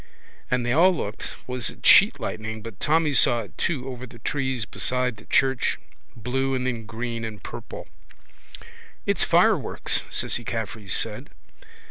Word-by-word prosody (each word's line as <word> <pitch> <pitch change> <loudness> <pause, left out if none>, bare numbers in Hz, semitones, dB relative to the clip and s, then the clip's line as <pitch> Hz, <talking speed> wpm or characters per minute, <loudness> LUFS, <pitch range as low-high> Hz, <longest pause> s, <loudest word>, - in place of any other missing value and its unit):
And 125 -3 0
they 120 - 0
all 170 +6 +6
looked 110 - -4
was 125 -1 -1
it - - -12
sheet - - +7
lightning 110 0 -5
but 115 -4 -9
Tommy 155 -1 +2
saw 120 -2 +4
it 105 - -12
too 135 -6 -2
over 130 -1 -7
the 115 - -14
trees 130 -1 -2
beside 125 +1 -1
the - - -15
church, 135 -1 +2 0.4
blue 130 +3 -1
and 125 -1 -2
then 115 -4 -3
green 115 0 -4
and 110 -3 -7
purple. - - -8 1.2
—It's - - +2
fireworks, - - +2
Cissy 120 - 0
Caffrey 110 -3 -5
said. - - +1
120 Hz, 150 wpm, -24 LUFS, 110-130 Hz, 1.2 s, sheet